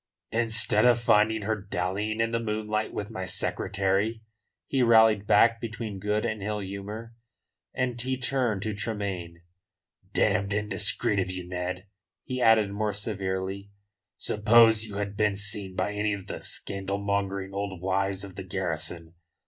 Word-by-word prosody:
"Instead 115 -2 +2
of 120 -1 +5
finding 110 -2 +3
her 110 +2 0
dallying 100 +2 -2
in 115 0 +1
the 115 - 0
moonlight 110 -1 -2
with 105 +2 -5
my 95 -4 -4
secretary," 100 +4 0 0.4
he 135 - 0
rallied 110 -3 +5
back 115 0 +5
between 110 -3 -5
good 105 +2 0
and 110 -1 -2
ill 105 +1 -2
humour. 100 +4 -6 0.6
And 125 -2 -1
he 130 +1 -1
turned 125 -6 0
to 110 - -2
Tremayne: 100 -5 -4 0.7
"Damned 100 +1 +1
indiscreet 100 0 +1
of 95 -1 -1
you, 90 -1 -5
Ned," 90 +1 -4 0.4
he 130 0 -4
added 110 -3 +5
more 105 +1 -1
severely. 100 -1 -3 0.5
"Suppose 110 +1 +5
you 105 -2 -8
had 100 0 -3
been 105 -1 +2
seen 100 -2 -3
by 105 - -1
any 105 0 0
of 100 -2 -6
the - - -6
scandalmongering 100 0 -2
old 100 -2 -3
wives 95 +1 0
of 95 -2 -9
the 95 - -6
garrison? 85 -3 -3
105 Hz, 150 wpm, -27 LUFS, 95-110 Hz, 0.7 s, of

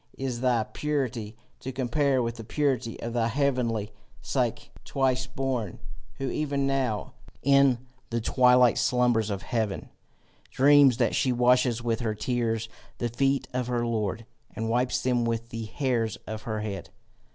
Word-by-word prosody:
is 130 -3 -3
thy 125 -3 +2
purity 125 -7 -3 0.2
to 130 - -5
compare 130 +1 +1
with 115 +1 -3
the 115 - -7
purity 130 -2 -1
of 115 0 -4
that 115 -1 +1
heavenly 125 -6 0 0.3
Psyche, - - -2
twice 130 -1 0
born, 130 -6 -3 0.4
who 135 - -3
even 140 -2 -1
now 130 -6 -1 0.3
in 140 -2 +5 0.3
the 115 - -1
twilight 125 +1 +4
slumbers 120 -3 +2
of 100 -2 -3
heaven, 110 -5 -2 0.6
dreams 140 -2 +6
that 120 -2 +2
she 130 - +2
washes 125 -1 +3
with 115 -1 0
her 110 -3 -1
tears 115 -1 -1 0.3
the 120 - -1
feet 135 +4 +1
of 125 -1 -1
her 120 -1 0
Lord, 110 -1 -2 0.3
and 115 0 -2
wipes 125 +2 +1
them 125 -2 +2
with 115 0 -2
the 115 -1 -5
hairs 115 -3 -1
of 110 0 -5
her 110 0 -3
head? 100 -2 -5
120 Hz, 150 wpm, -27 LUFS, 115-130 Hz, 0.6 s, dreams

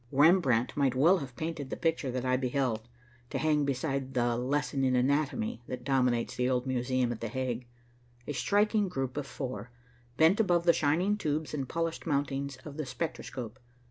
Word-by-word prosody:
Rembrandt 140 -5 +4
might 135 -3 +2
well 170 +8 +5
have 130 -4 -8
painted 160 -3 -4
the - - -4
picture 160 -4 0
that 125 0 -2
I 130 0 +3
beheld, 125 -3 -1 0.4
to - - -2
hang 150 -2 +2
beside 135 0 -2
the 120 -1 +2
"Lesson 135 +2 0
in 130 -1 +3
Anatomy" 130 -3 0
that 125 -1 -5
dominates 125 -3 +1
the 125 0 +1
old 125 -1 +1
Museum 130 -1 0
at 115 - -5
the 115 - -2
Hague. 125 0 -3 0.6
A 145 - -3
striking 205 - +2
group 135 -6 -3
of 145 -2 -3
four 125 -6 -5 0.5
bent 165 +6 +5
above 175 -6 +3
the 170 -1 +5
shining 175 +9 +2
tubes 155 -5 -2
and 135 -4 -3
polished 165 0 -2
mountings 140 -2 -1
of 150 -1 -8
the 155 - -2
spectroscope. 125 -4 -5
135 Hz, 175 wpm, -30 LUFS, 125-155 Hz, 0.6 s, well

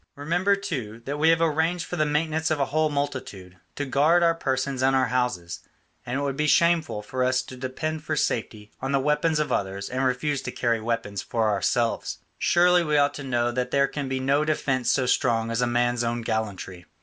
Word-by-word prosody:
Remember, 175 +7 +1
too, 125 - -5
that 145 +2 -3
we 160 +2 +4
have 165 0 +3
arranged 165 +2 +1
for - - -5
the 155 -3 +1
maintenance 160 +2 0
of 155 - 0
a 140 - +2
whole 155 0 +2
multitude, 130 -11 -4 0.2
to 145 - -3
guard 155 +6 +3
our 165 0 +4
persons 135 -4 -2
and 135 +1 +3
our 130 -1 +2
houses, 125 -10 -1 0.5
and 125 +2 -2
it - - -2
would 140 -1 -2
be 150 +1 0
shameful 160 -8 +2
for 130 +4 -2
us 130 0 +1
to 130 - -10
depend 150 +5 -4
for 155 - -2
safety 110 -6 -2
on 135 +1 -2
the 135 - +3
weapons 150 +3 +1
of 150 - -1
others 100 0 -2
and 130 +1 -2
refuse 130 +2 0
to 125 -2 -5
carry 115 -3 0
weapons 115 -3 -2
for 115 -2 0
ourselves. 115 +3 0 0.2
Surely 175 0 +4
we 150 -2 +1
ought 145 0 +3
to 145 - -7
know 120 -2 0
that 125 +1 -2
there 140 +1 +3
can 140 -2 -5
be 130 0 -1
no 140 +3 +2
defence 135 -5 0
so 130 - +2
strong 115 -2 +1
as 115 +1 0
a 125 - +2
man's 120 0 +1
own 120 0 -2
gallantry. 100 -5 -4
135 Hz, 215 wpm, -25 LUFS, 120-150 Hz, 0.5 s, we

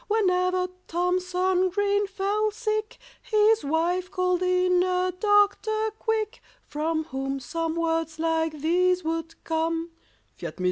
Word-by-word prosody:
Whenever 365 -3 +2 0.2
THOMSON 365 +1 +1
GREEN 405 +1 +1
fell 405 +2 0
sick 430 0 -3 0.2
His 430 -2 +3
wife 340 +5 0
called 365 -1 0
in 365 0 +3
a 365 0 +1
doctor, 430 +1 +2
quick, 440 -2 -2 0.2
From 315 +2 -1
whom 270 -1 -4
some 330 +5 -3
words 325 -1 -1
like 320 -2 -1
these 360 +3 +2
would 325 0 -3
come— 330 +1 -1 0.5
_Fiat - - -14
mist. - - -23
365 Hz, 125 wpm, -26 LUFS, 325-405 Hz, 0.5 s, His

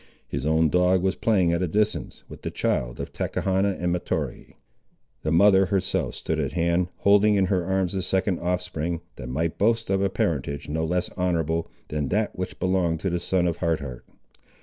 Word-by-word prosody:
His 70 - -3
own 80 0 +3
dog 90 +2 +3
was 95 0 +2
playing 95 -7 +2
at 85 - 0
a 90 - +1
distance, 105 +5 -1
with - - -11
the - - -3
child - - -1
of - - -6
Tachechana 95 +1 0
and 90 0 0
Mahtoree. 90 - -3 0.7
The 80 - -1
mother 95 +2 +5
herself 95 -1 0
stood 80 - -2
at 70 -2 -2
hand, 85 +1 +1
holding 105 +1 +5
in 95 -1 +3
her 90 -1 +1
arms 95 0 0
a 95 - -1
second 95 0 0
offspring, 85 -1 -2 0.2
that - - -7
might 80 +5 -2
boast 115 0 +2
of 95 0 +2
a 100 - +2
parentage 70 -5 -2
no 80 +2 -1
less 90 +2 -1
honourable, 85 -2 0 0.2
than 75 -2 -1
that 105 +6 0
which 90 0 -5
belonged 90 -3 +1
to 95 - -1
the 90 - 0
son 90 0 +1
of 85 -2 0
Hard 85 -2 0
Heart. 65 -4 -8
90 Hz, 195 wpm, -25 LUFS, 80-95 Hz, 0.7 s, mother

